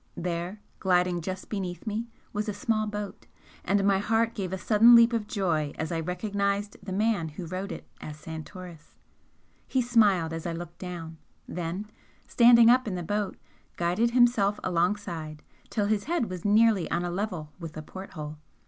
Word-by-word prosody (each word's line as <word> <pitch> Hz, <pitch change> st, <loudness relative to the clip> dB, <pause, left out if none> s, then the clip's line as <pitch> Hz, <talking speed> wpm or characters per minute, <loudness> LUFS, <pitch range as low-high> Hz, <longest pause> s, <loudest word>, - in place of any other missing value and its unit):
There, 175 Hz, +3 st, -3 dB, 0.2 s
gliding 180 Hz, -2 st, +2 dB
just 185 Hz, +2 st, -5 dB
beneath 180 Hz, -5 st, -4 dB
me, 220 Hz, +2 st, -2 dB, 0.3 s
was 210 Hz, +1 st, -2 dB
a 205 Hz, -, -3 dB
small 215 Hz, +1 st, 0 dB
boat, 210 Hz, -1 st, -6 dB, 0.4 s
and 200 Hz, +2 st, +2 dB
my 195 Hz, -1 st, +4 dB
heart 225 Hz, +2 st, +1 dB
gave 190 Hz, -4 st, -4 dB
a 190 Hz, -, -2 dB
sudden 225 Hz, +4 st, +6 dB
leap 235 Hz, +1 st, +7 dB
of 220 Hz, -2 st, -1 dB
joy 170 Hz, -, 0 dB
as 160 Hz, +2 st, -3 dB
I 165 Hz, -, -1 dB
recognised 200 Hz, +3 st, -1 dB
the 195 Hz, 0 st, -7 dB
man 205 Hz, -3 st, +1 dB
who 155 Hz, +4 st, -7 dB
rowed 185 Hz, +4 st, -4 dB
it -, -, -8 dB
as 150 Hz, -1 st, -7 dB
Santoris. 160 Hz, +1 st, -9 dB, 0.7 s
He 260 Hz, -, +1 dB
smiled 205 Hz, -9 st, +3 dB
as 165 Hz, +1 st, -4 dB
I 170 Hz, -, -2 dB
looked 170 Hz, 0 st, -8 dB
down, 170 Hz, -3 st, -7 dB, 0.3 s
then, 175 Hz, +4 st, -4 dB, 0.4 s
standing 235 Hz, -1 st, +7 dB
up 250 Hz, 0 st, +5 dB
in 195 Hz, -, -2 dB
the 175 Hz, -, -3 dB
boat, 205 Hz, +3 st, -2 dB, 0.4 s
guided 180 Hz, +7 st, +1 dB
himself 235 Hz, -4 st, +3 dB
alongside, 170 Hz, -4 st, -1 dB, 0.3 s
till 210 Hz, -3 st, 0 dB
his 205 Hz, 0 st, 0 dB
head 305 Hz, -, -1 dB
was 180 Hz, -1 st, -6 dB
nearly 210 Hz, -3 st, +4 dB
on 175 Hz, -, 0 dB
a 175 Hz, -, -2 dB
level 180 Hz, -5 st, -3 dB
with 165 Hz, -3 st, -7 dB
the 155 Hz, -, -7 dB
port 190 Hz, +5 st, -9 dB
hole. 150 Hz, -2 st, -7 dB
190 Hz, 175 wpm, -28 LUFS, 170-215 Hz, 0.7 s, leap